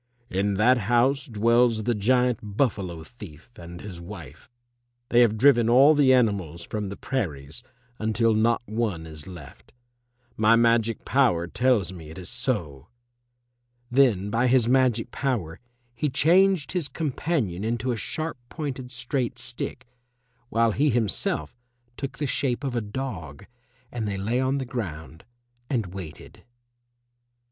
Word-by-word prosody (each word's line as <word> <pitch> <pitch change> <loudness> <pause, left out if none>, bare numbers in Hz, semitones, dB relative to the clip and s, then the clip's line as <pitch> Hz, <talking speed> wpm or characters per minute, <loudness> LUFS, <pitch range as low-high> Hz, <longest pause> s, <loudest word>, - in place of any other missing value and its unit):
"In 100 +2 0
that 120 +5 +4
house 130 +4 +3
dwells 115 0 +2
the 120 - +1
giant 125 +2 +2 0.2
Buffalo 95 - -1
thief 95 -2 -13
and 85 0 -10
his 95 -5 -8
wife. 85 -1 -11 0.6
They 120 - +4
have 115 -3 +4
driven 120 -2 +5
all 135 +6 +7
the 145 -3 +4
animals 100 -10 +1
from 105 +2 -4
the 100 - -7
prairies 80 - -4 0.4
until 110 +1 +2
not 115 +2 +2
one 105 -7 -2
is 80 -1 -10
left. 85 -7 -12 0.6
My 110 +1 +4
magic 115 -1 +2
power 120 -12 +2
tells 110 -1 +1
me 80 -4 -10
it 80 - -10
is 90 -1 -7
so!" 105 - -3 1.0
Then 115 -7 +3
by 120 +3 +2
his 125 -2 +3
magic 125 -3 +2
power 105 - -2 0.3
he 135 +5 -1
changed 175 +1 +3
his 175 -6 -1
companion 135 - -2
into 120 +3 -1
a - - -1
sharp 155 +8 -3
pointed 135 -5 -5
straight 125 0 -3
stick, 125 +1 -5 0.6
while 115 0 +2
he 145 +7 +2
himself 105 - 0 0.4
took 140 -1 -6
the 150 - -2
shape 135 -1 -1
of 135 -3 -2
a 120 - 0
dog, 105 - -6 0.5
and 115 -3 -3
they 100 -1 -2
lay 110 +6 -1
on 130 +1 +1
the 135 - -3
ground 85 - -6 0.4
and 110 -9 -2
waited. 90 -6 -10
115 Hz, 140 wpm, -25 LUFS, 95-130 Hz, 1.0 s, all